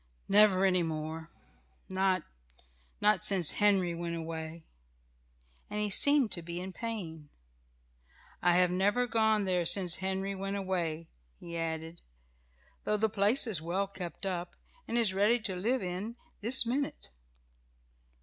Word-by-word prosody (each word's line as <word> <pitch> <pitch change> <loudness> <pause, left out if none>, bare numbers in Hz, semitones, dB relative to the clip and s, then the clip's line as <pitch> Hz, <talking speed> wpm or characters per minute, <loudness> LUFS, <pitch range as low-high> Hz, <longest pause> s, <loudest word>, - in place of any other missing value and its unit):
"Never 195 -2 +5
any 185 -2 +3
more. 160 0 -4 0.6
Not 190 -2 +1 0.8
not 210 +1 +3
since 195 -6 +2
Henry 195 -4 +2
went 170 0 -4
away," 160 0 -6 1.0
and 210 - -3
he 210 -1 -1
seemed 285 0 +5
to 170 - -1
be 170 +1 -6
in 185 +1 -6
pain. 170 -11 -6 1.1
"I 175 - +4
have 180 0 +4
never 205 +7 +2
gone 220 -3 +2
there 180 -2 +1
since 175 0 +2
Henry 190 +1 -2
went 195 +1 -4
away," 170 -4 -3 0.3
he 170 0 -9
added, 165 0 -4 0.8
"though 210 - +1
the 220 +1 +1
place 210 +6 +2
is 205 -9 -2
well 180 +4 -1
kept 190 -1 -7
up, 180 -2 -4 0.3
and 235 - -1
it - - +4
is 205 -5 +2
ready 210 +5 +3
to 195 -3 -2
live 225 +6 0
in 185 +6 -4 0.2
this 235 +4 +5
minute." 255 - -3
190 Hz, 140 wpm, -31 LUFS, 170-210 Hz, 1.1 s, Never